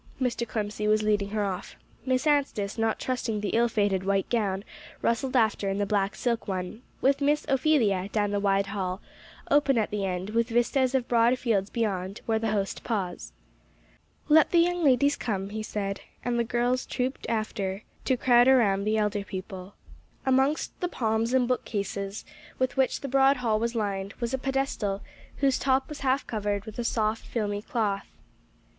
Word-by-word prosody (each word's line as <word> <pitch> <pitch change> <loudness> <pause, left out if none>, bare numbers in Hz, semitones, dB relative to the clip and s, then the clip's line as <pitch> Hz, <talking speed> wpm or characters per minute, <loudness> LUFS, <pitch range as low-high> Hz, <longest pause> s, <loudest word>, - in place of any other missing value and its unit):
Mr. 245 -2 -1
Clemcy 210 -1 -2
was 215 0 +3
leading 205 -1 +1
her 210 0 -1
off. 190 -1 -5 0.3
Miss 255 +2 +1
Anstice, 275 -9 +1
not 225 0 +1
trusting 245 -4 -2
the 205 -1 -2
ill 235 +1 +3
fated 205 -4 +1
white 195 0 +1
gown, 200 -5 0 0.4
rustled 255 +3 0
after 220 -4 +2
in 195 - -1
the 205 - +1
black 200 -1 0
silk 235 -2 -1
one, 185 +3 -4 0.2
with 275 +1 +3
Miss 295 +2 +2
Ophelia, 250 -9 +2
down 205 -2 0
the 205 - 0
wide 200 0 +2
hall, 195 -2 -3 0.5
open 280 -3 +4
at 220 - 0
the 205 -1 -2
end, 185 +1 -3
with 230 +2 +1
vistas 255 +3 +2
of 255 -2 0
broad 235 +1 +3
fields 210 -6 0
beyond, 195 -3 -2
where 220 -1 +1
the 225 0 -1
host 200 -2 -2
paused. 195 -6 -3 1.0
"Let 310 0 +6
the 345 - +2
young 350 +1 +3
ladies 280 +1 +4
come," 195 -4 -3
he 215 +1 -4
said; 200 -2 -3 0.2
and 240 -1 0
the - - +3
girls 245 +2 0
trooped 255 +2 -3
after, 215 -3 -2 0.2
to 260 - +2
crowd 245 0 +5
around 205 -7 +4
the 215 +1 +1
elder 210 -1 0
people. 190 -1 -7 0.5
Amongst 265 +3 +1
the 355 - -1
palms 225 -4 0
and 255 -1 +3
bookcases, 200 -4 -3 0.3
with 255 -1 0
which 265 -1 +1
the 275 - -4
broad 270 +1 +4
hall 225 -4 +1
was 235 +1 -1
lined, 200 -2 -2
was 235 +1 -2
a 265 - 0
pedestal, 265 -7 -1 0.3
whose 270 -2 +2
top 265 0 +2
was 300 -1 -7
half 270 +1 +1
covered 205 -2 -2
with 220 +1 -8
a - - 0
soft, 220 -1 0
filmy 205 -3 -2
cloth. 210 -3 -1
220 Hz, 180 wpm, -27 LUFS, 200-255 Hz, 1.0 s, Let